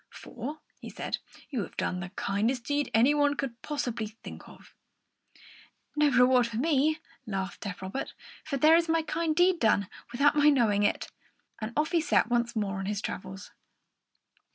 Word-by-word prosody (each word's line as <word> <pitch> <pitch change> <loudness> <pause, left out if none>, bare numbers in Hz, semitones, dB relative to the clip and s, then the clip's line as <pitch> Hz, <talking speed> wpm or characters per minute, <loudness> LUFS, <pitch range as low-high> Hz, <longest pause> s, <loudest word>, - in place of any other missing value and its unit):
"For," 300 +1 -8 0.2
he - - -8
said, - - -4 0.3
"you 255 -6 -1
have - - -8
done 180 - -1
the 185 0 -5
kindest 215 +6 -1
deed 290 +1 -1
any 240 +6 +4
one 290 -1 +2
could 255 -4 -5
possibly 245 -7 -3
think 220 +2 -11
of." - - -17 1.2
"No 300 0 +4
reward 250 -2 +4
for 230 -2 -5
me!" 305 +2 +2 0.3
laughed 195 -2 -4
deaf 190 -2 -6
Robert; 190 +8 -5 0.3
"for 280 - -3
there 310 +4 +6
is 335 0 +2
my 325 0 +2
kind 320 0 -1
deed 355 +1 +4
done 205 -3 +3 0.2
without 285 +5 +3
my 295 0 +6
knowing 225 -8 +3
it!" 205 - 0 0.5
And 215 +1 -4
off 305 +1 +1
he 340 -2 +3
set 245 -6 +2
once 235 0 +1
more 200 -3 -1
on 195 - -4
his 205 0 -1
travels. 190 +1 -6
250 Hz, 175 wpm, -29 LUFS, 210-295 Hz, 1.2 s, there